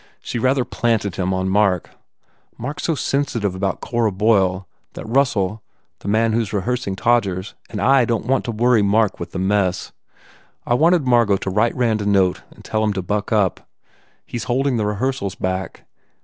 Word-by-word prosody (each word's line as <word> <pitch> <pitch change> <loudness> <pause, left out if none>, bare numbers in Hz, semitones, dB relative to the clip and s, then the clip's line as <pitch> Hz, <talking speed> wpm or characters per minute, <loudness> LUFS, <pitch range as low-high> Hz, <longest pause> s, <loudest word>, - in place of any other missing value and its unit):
She 120 - -4
rather 130 +1 +2
planted 110 -5 -1
him 95 0 -1
on 95 0 -1
Mark. 95 -2 +1 0.7
Mark 140 +6 -5
s - - -4
so 165 - +1
sen 140 0 0
sitive 105 -8 -2
about 95 0 -2
Cora 115 -3 0
Boyle 95 -3 +1 0.3
that - - -8
Russell 110 -5 +1 0.4
the - - -10
man 110 +2 +2
who 115 - +2
s 110 - -4
rehearsing 105 0 -2
Todgers 100 -4 0 0.2
and 105 - -5
I 135 +2 +4
don 115 -1 -1
t - - -11
want 135 +1 +2
to 120 - -2
worry 115 0 +3
Mark 105 +1 +2
with - - -5
the - - -5
mess. 95 -1 0 0.7
I - - +1
wanted 165 +3 +3
Margot 120 -5 +3
to 95 - -4
write 105 +5 +1
Rand 115 -4 +1
a 100 - -2
note 95 -3 +2
and - - -17
tell 110 0 -1
him 105 -1 +1
to 95 -1 -3
buck 105 +3 -2
up. 105 -5 0 0.6
He - - -6
s 115 - -5
holding 130 +1 +1
the 105 -2 0
rehearsals 105 -1 -2
back. 95 +1 -4
110 Hz, 195 wpm, -20 LUFS, 95-120 Hz, 0.7 s, I